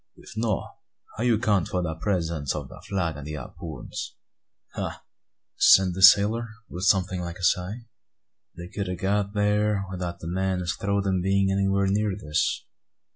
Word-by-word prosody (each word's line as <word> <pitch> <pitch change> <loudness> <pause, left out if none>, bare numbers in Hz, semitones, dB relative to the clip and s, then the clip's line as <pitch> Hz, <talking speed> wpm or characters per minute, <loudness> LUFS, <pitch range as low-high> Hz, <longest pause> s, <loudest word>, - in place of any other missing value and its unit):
"If 95 - -13
no', 110 -3 -1 0.5
how 110 - -3
you 120 -3 +3
count 105 -6 +1
for 90 -1 -1
de 80 -2 -2
presence 80 -5 -1
ob - - -5
de - - -12
flag 85 -6 -2
and 75 0 -8
de 75 - -5
hapoons?" 75 0 -7 0.6
"Ah!" - - -5 0.7
answered 95 -2 -1
the 95 - -5
sailor, 105 +4 +6 0.2
with 90 +3 -4
something 95 -1 +2
like 85 0 -5
a 95 - -10
sigh; 95 +7 0 0.7
"they 85 0 -7
kud 100 +1 -4
a' 90 - -2
got 100 +2 -1
thear, 105 -1 +1
without 90 -2 -4
the 80 - -7
men 95 +1 -1
as 85 - -1
throwed 100 0 -1
'em 95 -2 +1
bein' 95 +1 +2
anywhere 100 0 +2
near 100 0 +1
this. 75 -6 -1
95 Hz, 175 wpm, -26 LUFS, 85-100 Hz, 0.7 s, sailor